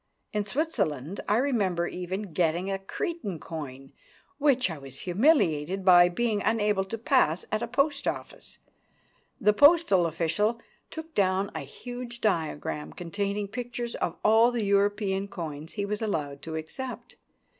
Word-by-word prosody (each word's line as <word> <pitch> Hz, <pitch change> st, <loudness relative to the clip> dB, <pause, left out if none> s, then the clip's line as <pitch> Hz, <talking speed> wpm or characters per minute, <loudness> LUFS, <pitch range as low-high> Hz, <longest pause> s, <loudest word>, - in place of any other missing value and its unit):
In 210 Hz, -1 st, -1 dB
Switzerland 195 Hz, -, -1 dB
I 210 Hz, -, +4 dB
remember 205 Hz, -10 st, +1 dB
even 185 Hz, +1 st, -5 dB
getting 175 Hz, +3 st, +1 dB
a 195 Hz, -, -1 dB
Cretan 210 Hz, -, -4 dB
coin, 135 Hz, -5 st, -7 dB, 0.5 s
which 265 Hz, -, +3 dB
I 160 Hz, -, -6 dB
was 135 Hz, -1 st, -8 dB
humiliated 185 Hz, -, +2 dB
by 175 Hz, -1 st, +8 dB
being 215 Hz, +2 st, 0 dB
unable 210 Hz, -3 st, +2 dB
to 225 Hz, +4 st, -5 dB
pass 225 Hz, -, +2 dB
at 215 Hz, +1 st, 0 dB
a 235 Hz, -, -2 dB
post 280 Hz, +3 st, 0 dB
office. -, -, -4 dB, 0.8 s
The 210 Hz, +1 st, +4 dB
postal 285 Hz, -, +5 dB
official 175 Hz, +8 st, 0 dB, 0.3 s
took 320 Hz, 0 st, -8 dB
down 195 Hz, 0 st, +1 dB
a 160 Hz, -, -3 dB
huge 240 Hz, -, -8 dB
diagram 160 Hz, -7 st, -1 dB
containing 200 Hz, +4 st, -3 dB
pictures 240 Hz, +1 st, -4 dB
of 170 Hz, -, -2 dB
all 225 Hz, +2 st, +6 dB
the 235 Hz, -3 st, -1 dB
European 200 Hz, 0 st, +1 dB
coins 160 Hz, -4 st, -6 dB
he 200 Hz, -1 st, -2 dB
was 210 Hz, +2 st, -3 dB
allowed 145 Hz, -10 st, -2 dB
to 160 Hz, +1 st, -6 dB
accept. 245 Hz, +12 st, -6 dB
200 Hz, 145 wpm, -28 LUFS, 170-235 Hz, 0.8 s, by